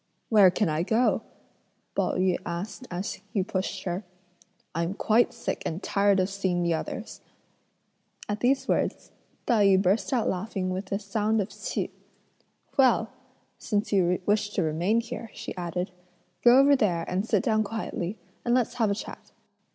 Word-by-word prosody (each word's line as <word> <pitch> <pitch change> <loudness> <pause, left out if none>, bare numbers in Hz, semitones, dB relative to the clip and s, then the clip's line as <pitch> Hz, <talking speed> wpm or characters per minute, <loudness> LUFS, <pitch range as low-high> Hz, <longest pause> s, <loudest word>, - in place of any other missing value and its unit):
"Where 205 -4 +7
can 195 +3 0
I 155 0 0
go?" 225 +7 +2 0.7
Pao - - 0
yü 185 -1 +2
asked 185 +9 -5
as 185 +5 -4
he 195 - +1
pushed 185 0 -3
her. 180 +2 -3 0.7
"I'm 170 +4 -1
quite 230 +3 +3
sick 235 -1 -4
and 170 +4 -4
tired 200 -1 +3
of 185 - +2
seeing 190 -3 0
the 170 -1 +2
others." 160 - -5 1.1
At 210 0 -2
these 265 +2 +2
words, - - -1 0.3
Tai 215 -4 +4
yü 190 -1 +5
burst 195 +7 +1
out 245 -4 +1
laughing 185 0 -2
with 190 +1 -4
a 195 - +1
sound 215 +2 0
of 200 0 -1
Ch'ih. - - -4 0.9
"Well! 240 -4 +4 0.5
since 205 -1 -1
you 180 -2 +3
wish 205 0 +2
to 185 - +2
remain 175 +9 +1
here," 235 -1 -7
she - - -6
added, 180 +1 -3 0.5
"go 240 +1 +8
over 280 +1 +6
there 175 -9 +1
and 185 +2 0
sit 210 -3 +1
down 215 -1 +2
quietly, 210 -3 -4 0.3
and 240 0 +2
let's 250 -3 +1
have 220 - +4
a 200 - +1
chat." - - -9
200 Hz, 165 wpm, -27 LUFS, 180-225 Hz, 1.1 s, go